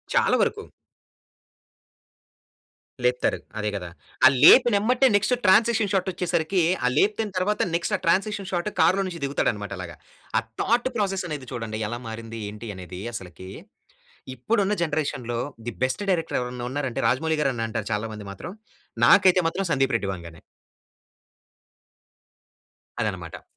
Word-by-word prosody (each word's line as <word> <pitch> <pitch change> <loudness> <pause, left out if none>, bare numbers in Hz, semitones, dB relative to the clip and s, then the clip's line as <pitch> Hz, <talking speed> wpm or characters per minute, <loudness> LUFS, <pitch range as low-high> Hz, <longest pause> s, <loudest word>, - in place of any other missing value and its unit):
చాలా - - +4
వరకు. - - 0 2.4
లేపుతారు. 125 0 +1 0.2
అదే 105 0 -1
కదా! 90 -3 -5 0.4
ఆ - - +12 0.2
లేపినెంబటే 245 - +6
నెక్స్ట్ 210 +5 +2
ట్రాన్సిక్షన్ 220 +2 +4
షాట్ 190 -1 +1
వచ్చేసరికి 175 0 0 0.2
ఆ - - +4
లేపిన 210 +4 +2
తర్వాత 210 +3 0
నెక్స్ట్ 170 - 0
ఆ - - -17
ట్రాన్సిక్షన్ 195 +2 +1
షాట్ 175 +2 -1
కార్‌లో 185 +4 +4
నుంచి 170 -2 -7
దిగుతాడన్నమాట 105 -7 -1
అలాగా. 85 -2 -7 0.4
ఆ - - +6 0.2
థాట్ 240 +2 +2
ప్రాసెస్ 195 -3 -1
అనేది 145 -4 -6
చూడండి 115 -2 -4
ఎలా 120 +1 -4
మారింది? 115 0 -7
ఏంటి? 105 +2 -8
అనేది 90 0 -8
అసలకి. 95 -2 -8 0.9
ఇప్పుడున్న 205 - +1
జనరేషన్‌లో 145 -7 -2 0.3
ది - - -2
బెస్ట్ 130 +11 -1
డైరెక్టర్ 165 -3 0
ఎవరైనా 125 0 -5
ఉన్నారంటే 135 -3 -3
రాజమౌళి 160 +4 0
గారు 135 -3 +1
అని 115 -1 -2
అంటారు 110 -2 -4
చాలా 110 +2 -3
మంది 105 -1 -9
మాత్రం. 140 - -8 0.5
నాకైతే 185 +4 +6
మాత్రం 195 +3 -2
సందీప్ 135 -2 +1
రెడ్డి 100 -4 -3
వంగానే. 85 -2 -11 2.6
అదనమాట. - - -4
155 Hz, 130 wpm, -24 LUFS, -, 2.6 s, ఆ